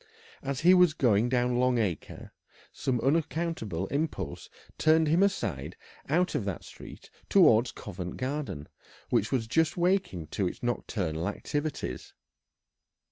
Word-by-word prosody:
As 140 +1 -3
he 180 +3 +7
was 180 -4 +5
going 120 -3 +3
down 125 -1 +1
Long 125 -1 +3
Acre 95 -9 -3 0.4
some 125 -2 -1
unaccountable 145 - -1
impulse 155 +3 -3 0.3
turned 160 0 +4
him 165 +5 +3
aside 100 - -1 0.3
out 175 +5 +2
of - - -1
that 95 -4 -4
street - - -12 0.2
towards 125 - +5
Covent 90 -3 -7
Garden, 130 - -4 0.4
which 105 - +1
was 125 -4 0
just 160 +9 +1
waking 175 - +1
to 95 - 0
its - - -7
nocturnal 90 -9 -2
activities. 145 +8 -4
130 Hz, 130 wpm, -29 LUFS, 105-160 Hz, 0.4 s, he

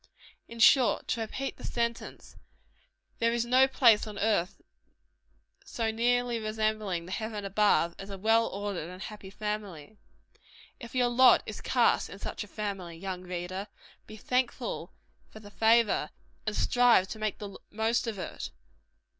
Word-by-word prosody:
In 230 - -10
short 250 +2 +5
to 235 - -1
repeat 265 +5 -4
the - - -13
sentence 235 -1 -4 0.8
there 230 0 +2
is 235 0 0
no 255 +2 +5
place 230 -5 +4
on 210 -1 -8
earth 205 -3 0 1.0
so 225 -2 -2
nearly 240 +1 +1
resembling 215 -5 -2
the 180 - -9
heaven 215 0 -4
above, 195 -4 +2
as 195 - -8
a 195 - -6
well 225 +3 +3
ordered 195 -4 -4
and 180 0 -10
happy 200 0 -8
family. 210 -3 -6 0.8
If 235 +1 -10
your 245 -1 +3
lot 255 +2 +6
is - - -7
cast - - +2
in - - -9
such - - -5
a - - -12
family, 195 -5 -5
young 185 0 -5
reader, 180 +2 -5 0.4
be 215 - -10
thankful 255 - -2 0.4
for 215 - -12
the 205 -1 -13
favor, 225 +1 +3 0.4
and 210 - -1
strive 245 -6 +4
to 220 - -7
make 215 -1 -2
the 205 -2 -8
most 225 +2 0
of 220 -3 -3
it. 185 - -6
215 Hz, 155 wpm, -29 LUFS, 195-235 Hz, 1.0 s, lot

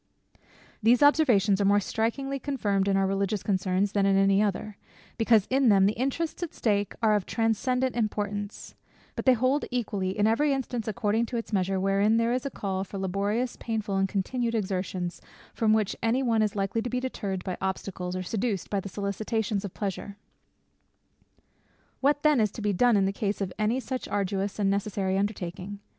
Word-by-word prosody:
These 235 +5 +4
observations 225 -10 +4
are - - +2
more 200 +1 +5
strikingly 270 +7 -2
confirmed 205 -9 0
in 195 -1 +2
our 195 - +2
religious 195 +1 -1
concerns 190 0 0
than 200 -1 +2
in 195 0 +3
any 195 +1 +4
other; 210 0 -2 0.4
because 225 -3 +4
in 265 -2 +4
them 195 -2 +5
the 205 - +2
interests 275 +9 -2
at 345 - -4
stake 205 -3 0
are 215 -1 +5
of 205 -3 0
transcendant 250 +3 0
importance: 205 -2 -3 0.4
but - - -4
they 260 - +7
hold 255 +5 +1
equally 200 -6 -2
in 205 - +3
every 275 +7 +3
instance 245 -4 -3
according 220 +2 0
to 240 - -3
its 230 -1 -5
measure, 190 -1 +1
wherein 200 +3 +2
there 230 +1 +2
is 255 +2 -1
a - - -3
call 190 -6 -3
for 195 +1 -8
laborious, 200 +6 -1
painful, 215 -3 -3
and 195 0 +1
continued 230 +4 -1
exertions, 185 -3 -3 0.3
from 220 -2 +2
which 215 -2 +2
any 235 +4 +1
one 230 -3 +2
is 210 -1 0
likely 195 +3 -1
to 245 - -3
be 250 - -1
deterred 200 -7 -4
by 185 - -3
obstacles, 185 -1 -3
or 185 - -3
seduced 210 0 -2
by 200 - +1
the 195 - -6
solicitations 205 +1 -2
of 200 - -5
pleasure. 200 0 -4 1.8
What 290 +1 +2
then 300 -4 +4
it 215 -2 +2
to - - -7
be 205 -1 +1
done 235 +4 +4
in 195 - +3
the 195 - 0
case 205 0 -2
of 190 -2 -3
any 220 +4 +1
such 260 0 -4
arduous 195 0 -2
and 205 -2 +1
necessary 200 -1 -1
undertaking? 195 -1 -3
205 Hz, 185 wpm, -27 LUFS, 195-235 Hz, 1.8 s, they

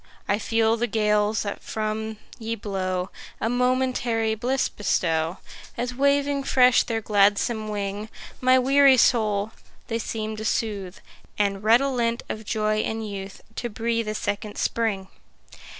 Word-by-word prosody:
I 200 - +1
feel 225 +1 +2
the 240 +1 0
gales, 210 -1 +1
that 205 -1 -5
from 220 0 -3 0.2
ye 225 0 -3
blow, 190 -3 -3 0.3
A 225 - 0
momentary 250 -3 +1
bliss 250 +4 0
bestow, 165 -4 0 0.4
As 245 +1 -2
waving 280 +1 +2
fresh 255 -2 +5
their 225 -2 -2
gladsome 210 +2 +2
wing, 205 0 -4 0.3
My 255 0 +5
weary 270 +1 +5
soul 215 -3 +2 0.4
they 230 0 -1
seem 220 -1 -4
to 215 - -5
soothe, 205 -4 -2 0.4
And, 200 -1 0
redolent 235 0 +2
of 215 0 -5
joy 215 0 0
and 220 0 -2
youth, 195 -1 -7 0.2
To 240 - -2
breathe 230 +1 -1
a 215 - -2
second 205 0 -3
spring. 210 -5 -1
220 Hz, 135 wpm, -24 LUFS, 205-240 Hz, 0.4 s, fresh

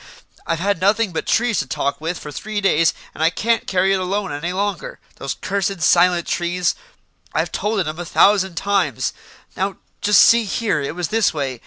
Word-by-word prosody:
I've 165 - 0
had 195 +1 -1
nothing 205 +1 +2
but - - -3
trees 235 -2 +2
to 140 - -2
talk 140 +4 -2
with 165 +2 -3
for 150 - -8
three 215 +8 -4
days, 165 -5 +3 0.2
and - - -8
I 160 - +5
can't 230 +6 -1
carry 190 +1 +2
it 195 - +1
alone 195 +1 -2
any 145 +5 -3
longer. 205 - -3 0.2
Those - - -4
cursed, 195 -1 -2
silent 175 0 +4
trees 175 +1 0 0.6
I've - - 0
told 210 -1 -1
it 170 - -3
'em 155 +2 -5
a - - -3
thousand 190 +1 +3
times. 200 +3 0 0.4
Now, 195 +1 -2 0.3
just 210 0 +6
see 230 -1 +5
here, 205 -6 -1
it 140 +3 -4
was 175 -2 -3
this 225 -6 +1
way. 135 -5 -3
185 Hz, 195 wpm, -20 LUFS, 165-205 Hz, 0.6 s, just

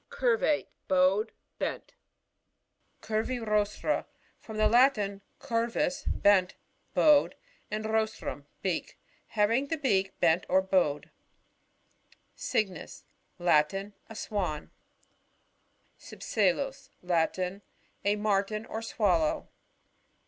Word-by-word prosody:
Curvatb. 470 -11 +1 0.2
— - - -49
Bowed, 190 +4 +3 0.3
bent. - - -4 1.1
10* - - -14 0.4
Curvirostra. 210 -1 0 0.2
— - - -36
From 220 -1 -8
the 215 0 +4
Latin, 215 -4 +3 0.2
cut" 230 0 -1
vus, 290 -2 -1
bcn(, 190 -3 +3 0.4
bowed; 300 -2 +5 0.3
and 215 +1 -3
rostrvm, 220 -9 -2 0.2
beak. 185 -4 -2 0.3
Having 230 +6 +1
the 325 - -1
beak 195 -9 +1
l>ent 170 +1 +3
or 190 +1 +4
bowed. 180 -7 +1 1.2
Cygnus. 190 -7 -3 0.2
— - - -44
Latin. 195 +7 +2 0.2
A 225 - -9
Swan. 190 -9 -3 1.3
Cypselus. 265 +7 -1
— - - -39
Latin. 180 +4 0 0.4
A 205 +1 +2
Martin 210 +1 0
or 220 - -5
Swallow. 185 -8 +1
210 Hz, 105 wpm, -29 LUFS, 185-225 Hz, 1.3 s, bowed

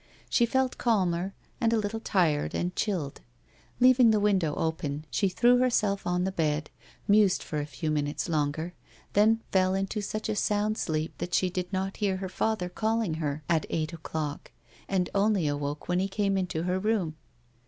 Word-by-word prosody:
She 235 - +4
felt 260 +1 0
calmer 190 -5 +1 0.3
and 230 -1 +3
a 230 - +3
little 215 +1 -2
tired 170 -9 +1
and 180 +1 -2
chilled. 175 -10 -2 0.6
Leaving 255 -1 +6
the 215 -1 +4
window 190 -7 +2
open, 155 -2 -2
she 195 +10 +1
threw 240 +6 +4
herself 215 -7 +1
on 180 0 +1
the 190 - 0
bed, 155 -4 -1 0.4
mused 205 -2 +4
for 150 - -3
a 145 - -3
few 155 +1 -3
minutes 145 +1 -1
longer, 155 +1 -1 0.4
than 220 +2 +4
fell 185 0 +3
into 195 +2 -2
such 215 +2 -4
a 215 - -1
sound 210 +1 0
sleep 155 -1 -2
that 175 - -2
she 185 -1 +2
did 180 0 -3
not 190 0 -2
hear 200 -3 0
her 190 0 -5
father 200 -1 -1
calling 220 0 -1
her 150 0 -2
at 165 -2 +1
eight 160 0 -2
o'clock, 155 -2 -5 0.4
and 185 -2 0
only 200 -4 +2
awoke 145 0 -3
when 180 0 +1
he 190 - +1
came 195 0 0
into 180 -4 -1
her 180 +1 0
room. 195 -6 0
185 Hz, 180 wpm, -28 LUFS, 160-210 Hz, 0.6 s, Leaving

